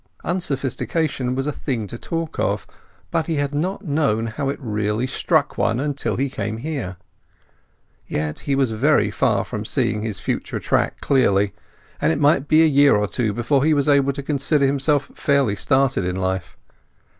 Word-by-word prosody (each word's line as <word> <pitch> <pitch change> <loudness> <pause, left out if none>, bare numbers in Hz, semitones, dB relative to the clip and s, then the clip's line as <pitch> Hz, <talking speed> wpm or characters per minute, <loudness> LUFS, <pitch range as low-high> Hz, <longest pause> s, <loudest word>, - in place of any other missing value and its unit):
Unsophistication 140 -4 -1
was 135 +1 -1
a 150 - 0
thing 125 -7 -3
to 105 - -8
talk 165 +6 -4
of; - - 0 0.5
but 165 -1 0
he 165 - 0
had 145 0 -1
not 185 +7 -2
known 140 -8 +1
how 135 +5 -3
it 140 - -3
really 105 -2 -1
struck 130 - 0
one 115 +2 +1
until 145 0 -2
he 135 +2 0
came 110 -4 -4
here. 115 - -4 1.1
Yet 75 0 -3
he 140 - -1
was 135 -4 +1
very 110 -2 +2
far - - +1
from - - -5
seeing 105 - 0
his 105 -3 -4
future - - -3
track - - 0
clearly, 100 -7 +2 0.5
and - - +3
it 155 - -1
might 145 -1 +3
be 155 +2 +5
a - - +6
year 145 -3 +5
or 105 0 +1
two 115 0 -1
before 120 +5 +1
he 155 0 +3
would 140 -1 +1
be 150 - +4
able 140 -1 +3
to 140 0 -6
consider 140 0 +1
himself 140 +1 +1
fairly 140 -7 +1
started 135 +1 +1
in 90 0 -2
life. 95 -1 -3
135 Hz, 180 wpm, -21 LUFS, 110-145 Hz, 1.1 s, a